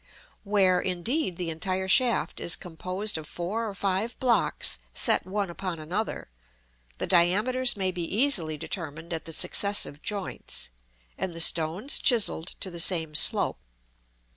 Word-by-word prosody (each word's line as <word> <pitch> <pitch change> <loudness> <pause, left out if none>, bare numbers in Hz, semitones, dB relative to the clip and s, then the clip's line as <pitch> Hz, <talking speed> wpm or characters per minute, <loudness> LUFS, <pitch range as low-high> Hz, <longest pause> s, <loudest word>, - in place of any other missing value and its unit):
Where, 195 -3 +3
indeed, 185 - -1
the 175 -2 -3
entire 185 +3 -2
shaft 245 +4 +3
is 170 - +1
composed 185 +2 -4
of 155 - -10
four 210 +8 -3
or 200 - -8
five 195 +5 -1
blocks 235 - +1 0.2
set - - +2
one 195 -1 -2
upon 180 -1 -4
another, 180 +8 -4 0.7
the - - -2
diameters 210 +8 +2
may 190 -1 0
be 180 -1 -5
easily 190 - +1
determined 165 +1 -5
at 160 - -4
the 165 - -7
successive 200 -3 0
joints, 200 - -3 0.5
and 175 -3 -3
the - - -5
stones 165 - +2
chiselled 215 - +2
to 190 - +1
the 170 - -5
same 165 -3 +3
slope. 150 - +4
185 Hz, 140 wpm, -27 LUFS, 165-210 Hz, 0.7 s, slope